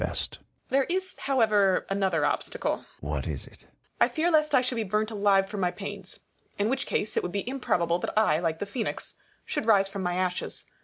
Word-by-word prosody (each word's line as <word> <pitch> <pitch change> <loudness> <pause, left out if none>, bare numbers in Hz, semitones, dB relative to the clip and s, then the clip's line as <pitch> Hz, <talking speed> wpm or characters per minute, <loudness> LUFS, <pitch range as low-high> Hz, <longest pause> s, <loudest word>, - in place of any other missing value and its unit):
There 270 0 +3
is 375 +1 -2
however 215 -8 +3
yet 195 - -1
another 185 -6 +1
obstacle. - - -1
Sion. - - -18 0.2
What - - -3
is - - -2
it? - - -14
Copernicus. - - -34 0.2
I - - +7
fear 335 +2 +1
lest 305 -2 +4
I 255 - +6
should 250 -1 -2
be 225 - +1
burnt 215 +2 0
alive 200 -2 +3
for 205 +1 -6
my 180 -2 +2
pains. 195 0 -7 0.4
In 205 +2 +1
which 265 +1 -1
case, 210 - -1
it - - +2
would 180 - -4
be 200 +3 -3
improbable 175 -10 +1
that - - -4
I, 160 -8 +4
like 165 -2 -1
the 205 - -3
Phoenix, 220 +3 -4 0.3
should 220 - -3
rise 200 -3 +5
from 195 0 -5
my 180 -1 -1
ashes. 180 -1 -2
205 Hz, 215 wpm, -28 LUFS, 185-245 Hz, 0.4 s, I